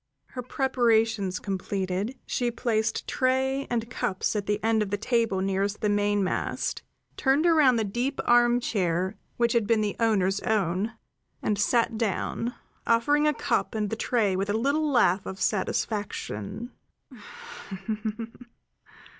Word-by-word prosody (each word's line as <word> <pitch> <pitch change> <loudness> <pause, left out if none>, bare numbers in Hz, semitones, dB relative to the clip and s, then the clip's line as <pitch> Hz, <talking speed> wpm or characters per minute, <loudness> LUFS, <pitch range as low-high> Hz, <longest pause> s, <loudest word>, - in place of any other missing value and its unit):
Her 250 - -6
preparations 225 -7 +1
completed, 195 +4 -3
she 245 -1 0
placed 225 -2 -1
tray 265 +1 0
and 235 -1 -1
cups 195 -4 -2
at 205 -1 -2
the 210 0 +1
end 225 -1 +2
of 210 - -1
the 205 - -1
table 225 -3 +1
nearest 195 +2 -1
the 210 - +1
mainmast, 205 -2 0 0.4
turned 275 +4 +2
around 305 -7 +5
the 225 - +1
deep 240 +7 -2
armchair 215 -7 +2 0.2
which 235 -1 +2
had 230 -4 +2
been 225 -1 +3
the 210 -1 -1
owner's 195 -4 +2
own, 205 +1 0 0.5
and 210 -1 0
sat 230 +1 +2
down, 230 +2 -2 0.3
offering 290 +6 +3
a 300 - +3
cup - - -1
and 210 -2 -1
the - - 0
tray 220 -4 +1
with 195 +2 -1
a - - +1
little 285 +6 +1
laugh 195 -8 +3
of 190 - -6
satisfaction. 205 - -2
220 Hz, 135 wpm, -27 LUFS, 200-240 Hz, 0.5 s, around